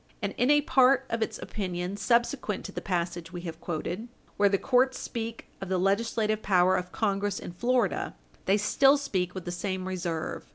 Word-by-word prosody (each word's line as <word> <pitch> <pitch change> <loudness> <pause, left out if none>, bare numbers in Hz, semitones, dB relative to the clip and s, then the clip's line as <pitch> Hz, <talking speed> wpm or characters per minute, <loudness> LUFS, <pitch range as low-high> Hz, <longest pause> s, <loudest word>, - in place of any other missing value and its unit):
And 200 -3 -2
in 245 +3 +2
a 295 0 +6
part 265 -1 +4
of 230 0 -1
its 220 - -1
opinion 180 -2 -4
subsequent 235 0 0
to - - -6
the - - -5
passage 175 -2 -2
we 175 -1 -6
have 165 -2 -7
quoted, 175 +6 -4 0.3
where 205 0 +4
the 195 - +2
court 255 +3 +3
speak 230 -1 -5 0.2
of 195 - -5
the 190 - +1
legislative 215 +3 +1
power 185 -2 +4
of 180 0 -3
Congress 200 -2 0
in - - -6
Florida, 240 +2 0 0.3
they 195 +2 +4
still 270 +7 +4
speak 190 -11 -2
with 185 - -6
the 175 - -3
same 185 +1 -3
reserve. 175 -3 -3
200 Hz, 190 wpm, -28 LUFS, 180-235 Hz, 0.3 s, a